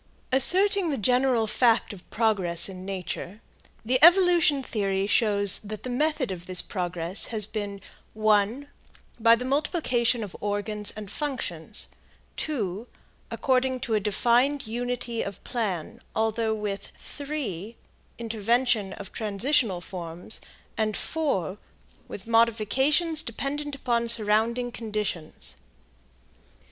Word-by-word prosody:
Asserting 375 - +3
the 280 - 0
general 250 +1 +3
fact 230 0 +2
of 185 -3 -14
progress 195 -7 +1
in 185 -1 -8
nature, 190 +1 -5 0.5
the 255 +4 +2
evolution 345 -5 +6
theory 195 -4 -1
shows 205 -2 +3
that 215 0 -7
the 255 - -4
method 295 -2 0
of 175 -1 -7
this 185 -1 0
progress 180 0 -3
has 215 -3 +3
been 205 -2 -4 0.4
(1) 215 +5 +2 0.5
by 230 0 +7
the 250 +2 -5
multiplication 255 -5 +1
of 200 - -8
organs 210 0 -2
and 210 -2 -8
functions; 215 - -2 0.5
(2) 220 - -3 0.4
according 260 -1 +1
to 230 - -2
a 215 - +4
defined 240 +7 +2
unity 240 0 -3
of 200 -2 -6
plan, 205 -10 -3
although 220 0 +1
with 205 -2 -4
(3) 235 - -5 0.4
intervention 230 -2 +1
of 200 - -9
transitional 215 -2 0
forms, 175 +1 -7 0.4
and 215 -1 +1
(4) 205 - -1 0.5
with 195 - -8
modifications 235 - +3
dependent 290 +3 -4
upon 235 -3 0
surrounding 230 +2 +2
conditions. 210 -8 -4
225 Hz, 115 wpm, -26 LUFS, 200-255 Hz, 0.5 s, by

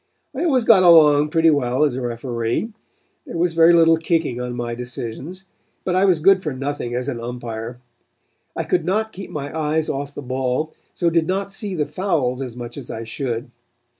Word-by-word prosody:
I 305 +7 -1
always 265 -7 +3
got 225 -4 +6
along 150 -4 +6
pretty 165 +1 +4
well 130 -1 +1
as 145 -5 +1
a 130 - -3
referee. 120 - -2 0.5
There - - -5
was 170 0 +1
very 165 +1 +6
little 165 -1 +5
kicking 160 -7 -1
on 125 0 -4
my 120 -1 -3
decisions. 125 +8 -6 0.4
But 185 - -1
I 185 +2 +3
was 180 -5 +3
good 190 +3 +5
for 155 -6 -3
nothing 135 -2 -4
as 125 0 -2
an 125 -4 -3
umpire. 120 0 -6 0.8
I - - -1
could 175 -2 0
not 215 +6 0
keep 195 +1 -8
my 145 0 -6
eyes 155 0 0
off 140 +1 -4
the - - -6
ball, 130 +4 -2 0.2
so 170 -2 +1
did 165 -1 +2
not 195 +2 -2
see 195 -1 -4
the 150 -3 0
fouls 145 -10 -1
as 125 -3 -6
much 120 +1 -7
as 135 -4 -8
I 115 - -5
should. 120 0 -4
150 Hz, 195 wpm, -21 LUFS, 125-170 Hz, 0.8 s, got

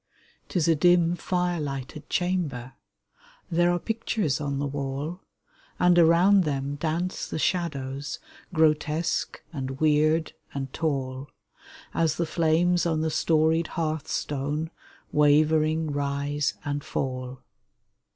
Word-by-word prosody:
'Tis 170 -4 +1
a 165 - +5
dim, 175 +1 +4
fire 180 0 -1
lighted 135 0 -6
chamber; 160 -9 -1 0.8
There 175 +1 +3
are 175 - +1
pictures 215 - -1
on 140 -1 -2
the 140 - -1
wall; 140 +4 -4 0.6
And 180 -1 +5
around 175 +4 +6
them 140 -2 -2
dance 165 +5 -2
the - - -4
shadows 145 -5 -2 0.3
Grotesque 155 0 +1
and 135 -2 -4
weird 155 +1 +2 0.2
and 135 -1 -4
tall, 135 -3 -2 0.6
As 160 -2 +1
the 170 - 0
flames 170 +2 +2
on 160 -2 0
the 160 0 0
storied 160 +1 +2
hearth 160 -2 -1
stone 145 +3 -2 0.4
Wavering 155 +1 +3
rise 145 +1 -1
and 145 0 -2
fall. 130 -1 -4
155 Hz, 115 wpm, -26 LUFS, 140-170 Hz, 0.8 s, around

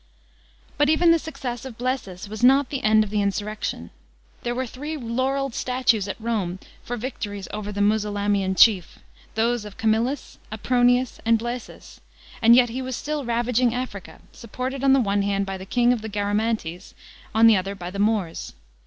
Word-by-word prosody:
* - - -32
But 290 0 +4
even 330 +2 +5
the 335 - +4
success 265 -7 -6
of 260 -4 -9
Blsesus 240 -7 -3
was 215 +2 -7
not 270 +1 +5
the 275 -2 -2
end 215 0 +5
of 205 - -7
the 210 -1 +1
insurrection. 205 - -3 0.5
There 240 0 -2
were 260 +1 -1
three 295 +6 -6
laurelled 260 +2 -1
statues 240 -6 +1
at 200 - -5
Rome 215 -6 -2 0.3
for 245 - -4
victories 210 -5 -5
over 210 0 -4
the 205 0 -3
Musulamian 205 -2 +1
chief 190 -4 +4 0.2
— - - -27
those 230 +1 +1
of 210 -1 -10
Camillus, 225 +5 -1
Aprouius, 245 +2 +2
and 230 0 +4
Blaesus 240 +1 -7 0.2
— - - -20
and 230 +1 +7
yet 245 -1 +5
he 250 +3 -4
was 260 -1 -4
still 295 0 -3
ravaging 240 +1 +1
Africa, 245 -6 -6
supported 255 +4 -5
on 270 -1 +5
the 270 - +5
one 205 -4 +1
hand 200 0 0
by 195 0 -4
the 190 - -9
king 245 +2 +3
of 235 - -3
the 220 - -6
Garamantes, 205 -3 -2 0.4
on 225 +1 +6
the 225 -1 +8
other 195 +1 -2
by 180 -2 -7
the 200 - -6
Moors. 205 -5 -1
225 Hz, 190 wpm, -24 LUFS, 205-250 Hz, 0.5 s, the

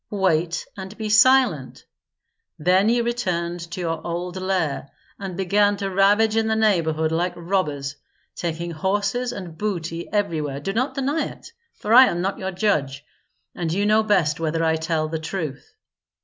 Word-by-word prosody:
"Wait 175 -4 0
and 190 +1 -8
be 215 -1 -4
silent! 220 - +3 0.7
Then 185 +6 +3
you 235 0 +2
returned 180 -8 -2
to 180 - -6
your 165 -2 -2
old 175 +1 -4
lair, 185 -7 -1 0.3
and 190 -3 -6
began 205 +2 +2
to 195 -1 -3
ravage 205 +3 +3
in 225 0 +2
the 220 - +1
neighborhood 165 -8 +1
like 175 +2 -1
robbers, 155 -6 -2 0.4
taking 170 0 -3
horses 205 +8 -1
and 175 -5 -7
booty 170 -5 -3
everywhere. 155 -9 -1
Do 195 +7 -3
not 255 +6 -1
deny 280 +3 0
it, - - -12 0.2
for 215 - -1
I 255 +2 +10
am 175 - -1
not 190 +3 -2
your 190 - -3
judge, 150 -8 -1 0.5
and 170 -2 -3
you 200 +4 0
know 215 +1 +4
best 185 -9 +1
whether 165 0 -1
I 160 0 +2
tell 160 -1 -1
the 160 0 -3
truth. 160 - -5
185 Hz, 165 wpm, -23 LUFS, 160-210 Hz, 0.7 s, I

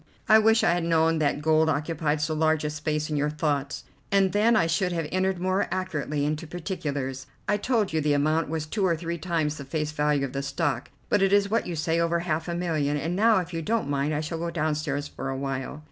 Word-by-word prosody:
I 220 0 +7
wish 225 +1 +4
I - - +4
had 175 -1 -1
known 165 -1 +2
that 145 -1 0
gold 160 0 +3
occupied 155 0 -1
so 155 +1 0
large 155 0 +2
a 150 - -1
space 150 0 -2
in - - 0
your 145 +1 +1
thoughts, 150 -2 -2 0.3
and 195 -1 +3
then 220 +3 +3
I 175 - +4
should 175 +3 0
have 165 -3 -2
entered 185 0 +1
more 185 +2 0
accurately 150 -6 -2
into 155 +2 -2
particulars. 145 -7 -4 0.2
I 205 - +2
told 215 -4 0
you 160 - +1
the 150 0 +2
amount 155 +2 +1
was 160 -1 -2
two 200 +6 -2
or 170 -3 +2
three 170 +1 -4
times 155 -3 -1
the 140 - -6
face 150 +2 -3
value 150 -2 +1
of 130 - -7
the 135 - -2
stock, 145 +3 -2 0.2
but 205 - +2
it 195 0 +3
is 200 0 +3
what 230 - +1
you 175 - -3
say, 160 +1 0
over 170 0 +1
half 160 -1 -2
a 170 - -2
million, 155 -5 0
and 160 +5 -2
now 215 0 +4
if 180 0 -9
you 165 - -2
don't 215 -4 -1
mind 140 +1 0
I 150 0 -1
shall 160 +1 -4
go 170 +1 -2
downstairs 150 -3 -1
for 135 - -6
a 135 - -3
while." 135 +1 -4
160 Hz, 240 wpm, -26 LUFS, 150-175 Hz, 0.3 s, I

